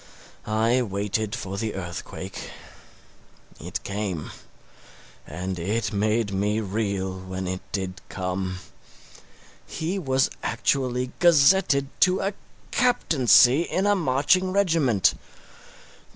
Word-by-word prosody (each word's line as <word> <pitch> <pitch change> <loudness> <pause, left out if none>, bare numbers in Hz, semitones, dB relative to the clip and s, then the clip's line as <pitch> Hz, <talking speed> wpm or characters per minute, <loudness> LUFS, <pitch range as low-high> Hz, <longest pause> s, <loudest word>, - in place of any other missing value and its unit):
I 110 +4 +2
waited 105 0 -2
for 95 +1 -5
the 110 -1 -3
earthquake. 85 -3 -7 1.1
It - - -5
came. 100 -5 -4 1.0
And 90 +3 -5
it 105 +6 -1
made 105 +1 0
me 105 +3 0
reel 100 -2 -2
when 95 0 -5
it 95 0 -3
did 95 -2 -4
come. 95 0 -3 1.1
He 175 +5 -3
was 130 -5 +1
actually 125 +1 -1
gazetted 165 -3 +4
to 185 0 +4
a 195 +1 -1 0.4
captaincy 145 - +4
in 185 +3 -1
a 205 - +4
marching 180 +3 +2
regiment! 165 - +3
110 Hz, 100 wpm, -25 LUFS, 95-145 Hz, 1.1 s, gazetted